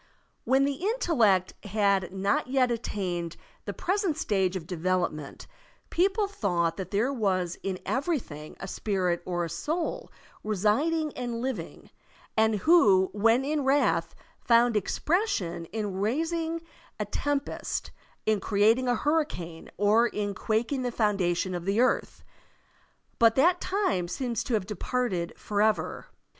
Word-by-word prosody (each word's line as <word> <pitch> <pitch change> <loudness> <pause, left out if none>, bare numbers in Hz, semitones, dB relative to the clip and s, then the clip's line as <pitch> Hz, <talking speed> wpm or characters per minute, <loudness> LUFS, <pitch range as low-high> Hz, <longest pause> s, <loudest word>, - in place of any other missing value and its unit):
When 265 +3 +4
the 280 -1 -1
intellect 240 - +2
had 200 -2 +1
not 195 +4 0
yet 255 -1 +2
attained 180 -7 -3 0.3
the - - -3
present 375 -4 0
stage 195 - 0
of 180 -4 -4
devel 180 +1 0
opment, 150 -2 -9 0.5
people 390 +4 +2
thought 175 - 0
that 185 -2 -5
there 225 +8 +1
was 185 -7 -1
in 190 -1 -3
every 295 +5 0
thing 150 - -9
a 190 - -6
spirit 185 -4 -1
or 175 -1 -1
a - - -4
soul 315 - -3 0.3
residing 275 - +1
and 240 -2 -3
living, 260 0 -5 0.4
and 220 0 +3
who, 200 - +5
when 225 +5 +3
in 295 0 0
wrath, 275 +2 +2 0.3
fotind 235 -1 +4
expression 210 - 0
in 210 +1 -4
raising 325 +8 -1 0.4
a - - -1
tempest, 290 -1 -2 0.3
in 215 -1 +2
creating 220 +6 +3
a 245 - +3
hurricane, 230 - -2
or 215 +4 +4
in 205 -3 -3
quaking 230 +7 -1
the 250 -1 -1
foundation 185 -5 0
o! 175 - -2
the 195 +5 -1
earth* 255 +1 +1 1.0
But 230 -1 +5
that 345 +6 +4
time 370 - 0
seems 240 +3 -2
to 240 - 0
have 205 -4 -1
departed 210 -4 -2
forever. 210 +1 0
220 Hz, 135 wpm, -28 LUFS, 185-275 Hz, 1.0 s, who